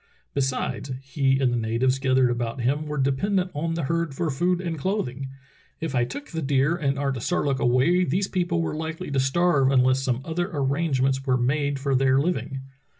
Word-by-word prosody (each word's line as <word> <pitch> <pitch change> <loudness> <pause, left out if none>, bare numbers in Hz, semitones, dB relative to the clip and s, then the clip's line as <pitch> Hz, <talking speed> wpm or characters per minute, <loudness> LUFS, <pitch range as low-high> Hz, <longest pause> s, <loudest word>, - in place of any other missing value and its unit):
Besides, 135 0 -2
he 135 -1 +1
and 130 -3 +2
the - - +1
natives 120 +4 +1
gathered 130 -2 +3
about 120 +1 -3
him 145 +5 0
were 150 0 -3
dependent 180 +8 0
on 165 +3 -2
the 165 - -2
herd 165 -1 -1
for 155 +2 -1
food 175 +6 +1
and 170 -3 -3
clothing. 140 - -2 0.5
If 160 -4 -3
I 120 -2 +2
took 285 - -8
the 165 -1 -4
deer 140 +2 +2
and 140 -5 -1
Artisarlook 135 +1 -1
away 135 +9 +3
these 185 +5 0
people 175 -3 0
were - - -2
likely 160 +2 -5
to 140 - +1
starve 140 0 +3
unless 130 0 +3
some 130 -1 -1
other 175 +3 -2
arrangements 135 -2 0
were 130 -1 +3
made 140 +3 0
for 135 0 -1
their 130 0 +3
living. 140 -3 -1
140 Hz, 185 wpm, -25 LUFS, 130-165 Hz, 0.5 s, gathered